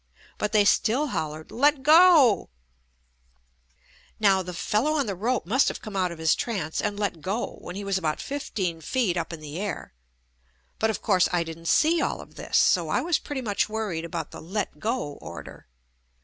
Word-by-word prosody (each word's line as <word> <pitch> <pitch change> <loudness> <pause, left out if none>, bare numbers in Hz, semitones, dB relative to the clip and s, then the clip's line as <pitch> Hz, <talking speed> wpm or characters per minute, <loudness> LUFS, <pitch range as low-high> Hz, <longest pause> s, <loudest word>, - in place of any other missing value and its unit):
But 210 - -1
they 210 -2 +4
still 255 +8 +2
hollered 155 -6 -4
"Let 285 +2 +2
go 310 - +6
I" - - -41 0.4
Now 195 -3 +4
the 180 0 -6
fellow 215 - 0
on 290 -3 +1
the 200 - -2
rope 225 +5 -1
must 255 +10 +3
have - - -2
come 215 -3 -9
out 185 -2 +1
of 170 - -8
his 160 0 +3
trance 185 -10 -2
and 205 - -2
let 195 -6 -2
go 200 +9 -3
when 180 - -8
he 200 - -5
was 195 -1 0
about 155 -4 -2
fifteen 190 - -3
feet 220 - 0
up 170 -1 -3
in 165 -2 -8
the 150 +2 -7
air. 205 - -5 0.9
But 220 - +2
of 220 - -3
course 185 -4 +3
I 175 -1 +1
didn't 165 0 -8
see 325 - +3
all - - -1
of - - -12
this, - - -1
so - - +3
I - - +1
was 340 -2 +1
pretty 285 -3 -5
much 210 -3 0
worried 210 -7 -3
about 170 -2 -5
the - - -9
"let 180 -2 -4
go" 220 - -3
order. - - -10
195 Hz, 195 wpm, -26 LUFS, 160-230 Hz, 0.9 s, go